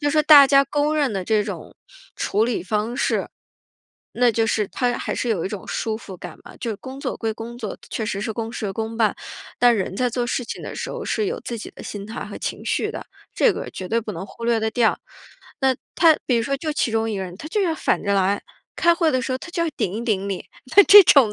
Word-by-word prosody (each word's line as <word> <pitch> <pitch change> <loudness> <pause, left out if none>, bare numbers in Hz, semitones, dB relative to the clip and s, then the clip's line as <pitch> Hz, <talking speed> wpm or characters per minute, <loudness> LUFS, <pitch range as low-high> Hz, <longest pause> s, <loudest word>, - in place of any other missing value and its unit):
就 290 -1 +1
说 305 +1 +3
大 295 -2 +9
家 275 0 +5
公 290 +2 0
认 285 -7 +1
的 190 -2 -3
这 215 +1 +2
种 - - -7 0.4
处 210 +2 0
理 235 -1 -1
方 215 +5 -2
式， - - 0 0.8
那 245 0 +3
就 225 0 +1
是 215 -2 0
它 245 +5 -1
还 - - -3
是 245 - -2
有 200 -8 0
一 - - -1
种 200 -2 -7
舒 220 -1 -2
服 195 -4 -10
感 175 -2 -10
嘛。 - - -13
就 230 -2 -3
工 265 +5 -9
作 - - -3
归 225 -1 -2
工 230 +2 -8
作， 220 -4 -5
确 225 - -2
实 200 -3 -2
是 220 +1 -3
公 225 +1 -4
事 210 -4 -4
公 225 +2 -4
办， 220 -3 +2 0.4
但 245 -1 +5
人 190 -1 -3
在 250 +3 +1
做 245 0 -2
事 250 +1 -2
情 - - -7
的 - - -7
时 - - -5
候 - - -5
是 430 - -1
有 470 +4 -3
自 235 - -5
己 - - -8
的 - - -10
心 205 -1 -7
态 220 - -6
和 - - -8
情 - - -5
绪 - - 0
的， - - -7 0.3
这 - - +4
个 - - -6
绝 185 - -7
对 230 +3 +1
不 215 -2 -6
能 175 +2 -6
忽 215 +4 -10
略 235 -1 +2
得 220 0 0
掉。 230 -1 +2 0.6
那 265 -1 +3 0.2
他 325 -3 +6
比 250 - +2
如 230 - +1
说 275 +4 -1
就 310 +3 -3
其 270 - 0
中 225 0 0
一 210 - -2
个 190 - -3
人， 180 -1 -8
他 300 - -8
就 420 - 0
要 335 -3 +1
反 - - 0
着 200 - 0
来， 195 +1 +1 0.3
开 340 0 +4
会 335 -2 +2
的 255 -2 0
时 260 - -2
候 255 - -1
他 360 - -10
就 340 -1 -1
要 - - 0
顶 205 -6 -1
一 225 - -3
顶 200 -4 0
你， 195 -2 -4 0.3
那 405 - +11
这 410 0 +10
种 265 -10 +6
230 Hz, 285 characters per minute, -22 LUFS, 210-275 Hz, 0.8 s, 那